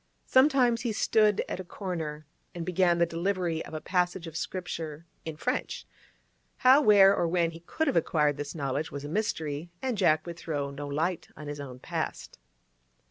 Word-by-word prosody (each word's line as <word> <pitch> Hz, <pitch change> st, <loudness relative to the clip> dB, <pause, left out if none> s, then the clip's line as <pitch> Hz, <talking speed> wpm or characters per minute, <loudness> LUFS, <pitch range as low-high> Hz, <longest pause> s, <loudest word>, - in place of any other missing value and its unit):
Sometimes 260 Hz, -3 st, +4 dB
he 235 Hz, -2 st, -1 dB
stood 210 Hz, -1 st, +3 dB
at -, -, -4 dB
a -, -, -4 dB
corner 165 Hz, -5 st, -5 dB, 0.3 s
and 170 Hz, -1 st, -4 dB
began 180 Hz, -1 st, +2 dB
the 170 Hz, -, +4 dB
delivery 170 Hz, -1 st, -1 dB
of 155 Hz, -, -9 dB
a -, -, -2 dB
passage 180 Hz, 0 st, 0 dB
of 165 Hz, -1 st, -9 dB
Scripture 165 Hz, -3 st, -5 dB, 0.2 s
in 160 Hz, -2 st, -5 dB
French; 250 Hz, -, -2 dB, 0.8 s
how, 265 Hz, +3 st, +8 dB
where, 200 Hz, -5 st, +7 dB
or 170 Hz, -, +1 dB
when 170 Hz, -1 st, +1 dB
he 165 Hz, -, -10 dB
could 245 Hz, -, -2 dB
have 280 Hz, -, 0 dB
acquired 150 Hz, -3 st, +2 dB
this 145 Hz, +1 st, -5 dB
knowledge 145 Hz, +1 st, -2 dB
was 145 Hz, 0 st, -6 dB
a -, -, -4 dB
mystery, 160 Hz, -4 st, -2 dB
and 255 Hz, -6 st, -2 dB
Jack 155 Hz, -5 st, +3 dB
would 170 Hz, -1 st, -7 dB
throw 145 Hz, -3 st, -3 dB
no 145 Hz, +1 st, -6 dB
light 160 Hz, +5 st, -1 dB
on 150 Hz, -, -8 dB
his 145 Hz, 0 st, -5 dB
own 130 Hz, -3 st, -7 dB
past. 125 Hz, -, -5 dB
170 Hz, 185 wpm, -28 LUFS, 150-195 Hz, 0.8 s, how